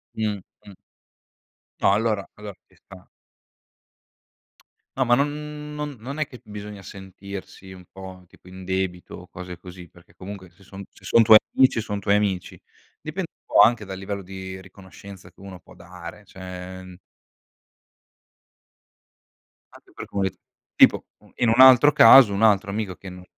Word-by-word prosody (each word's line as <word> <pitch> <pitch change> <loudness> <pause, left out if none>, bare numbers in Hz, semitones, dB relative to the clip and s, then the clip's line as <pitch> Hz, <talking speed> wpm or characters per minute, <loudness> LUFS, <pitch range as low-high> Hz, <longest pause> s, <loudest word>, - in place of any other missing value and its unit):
Mh-mh. 105 -2 -6 1.1
No - - +4
allora 105 -2 -1
allo 105 -1 -9
ci - - -28
sta. 95 -1 -17 1.9
No 130 - +1
ma 120 - +4
non 150 +2 -4
non 150 -2 -5
non 135 +6 -8
è 155 - 0
che 125 -4 -14
bisogna 105 -1 -9
sentirsi 95 0 -11
un 90 -1 -13
po', 95 -1 -12
tipo, 90 - -20
in 95 0 -11
debito 95 -1 -4
o 90 - -13
cose 90 -1 -10
così, 90 0 -12
perché 85 +1 -22
comunque 95 -1 -10
se 90 +3 -24
son 95 +1 -11
se - - -20
son 115 - +4
tuoi 110 0 +9 0.2
amici, 130 -3 +4
son 105 -2 -4
tuoi 100 +1 +1
amici. 95 -4 -2 0.4
Dipende 170 +3 -6
un - - -
po' - - +4
anche 115 -3 +3
dal 95 -1 -7
livello 100 0 -6
di 95 0 -9
riconoscenza 95 0 -14
che - - -28
uno 95 -2 -11
può - - -19
dare, - - -12
cioè 95 0 -10 2.8
Anche 375 - -19
per - - -9
comit 95 -2 -3 0.4
tipo - - +4
un - - -23
in 120 - +1
un 115 +3 +1
altro 130 +2 +8
caso 115 -5 +8
un 100 - -2
altro 105 -2 +3
amico 100 -3 -4
che 95 +1 -11
non 90 0 -12
100 Hz, 155 wpm, -23 LUFS, 95-110 Hz, 2.8 s, tuoi